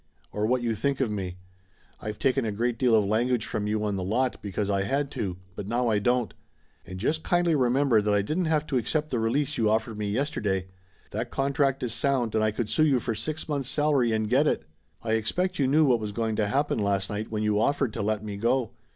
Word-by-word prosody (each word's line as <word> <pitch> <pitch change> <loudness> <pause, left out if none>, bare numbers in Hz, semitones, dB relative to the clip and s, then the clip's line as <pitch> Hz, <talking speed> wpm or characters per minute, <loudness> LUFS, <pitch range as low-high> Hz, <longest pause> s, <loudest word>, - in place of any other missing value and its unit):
Or 105 +1 -1
what 125 +1 +1
you 115 -1 +1
think 140 +6 -1
of 130 -5 0
me. 95 -3 -4 0.6
I've 105 0 -5
taken 135 -1 +1
a 110 - -1
great 115 +2 -1
deal 125 -3 +4
of 105 -2 +3
language 115 +3 +1
from 105 -1 -3
you 105 0 0
on 100 -2 -1
the 95 - -3
lot, 125 +7 0
because 100 0 -2
I 100 -1 +1
had 140 +8 -1
to, 90 -3 -3 0.2
but 100 - -6
now 120 +2 +1
I 105 -2 +2
don't. 120 -1 +1 0.5
And 95 +1 -7
just 155 +10 0
kindly 175 -1 +2
remember 130 -3 +3
that 105 0 0
I 100 -1 +3
didn't 165 - -1
have 155 -1 +1
to 135 - -1
accept 155 +5 -2
the 120 - 0
release 135 +6 0
you 110 -2 +3
offered 110 0 0
me 105 -1 -2
yesterday. 105 -6 -1 0.5
That - - -3
contract 135 -1 0
is 120 -2 -2
sound 125 -3 0
and 110 - +2
I 110 - +3
could 110 +1 -2
sue 155 +7 +3
you 135 -4 +3
for 115 - -2
six 155 +8 -3
months' 140 -4 -2
salary 145 -4 +2
and 110 -1 0
get 135 +7 +3
it! - - 0 0.4
I 110 - -2
expect 175 - 0
you 135 - +3
knew 150 +3 +4
what 125 -4 +3
was 105 -1 -5
going 110 0 -1
to 105 - +1
happen 140 +4 0
last 100 -1 0
night, 105 +1 -3
when 110 -1 -2
you 105 -1 +2
offered 140 -2 +1
to - - -3
let 105 0 -1
me 100 -1 -5
go! 120 +2 +1
115 Hz, 240 wpm, -27 LUFS, 105-135 Hz, 0.6 s, deal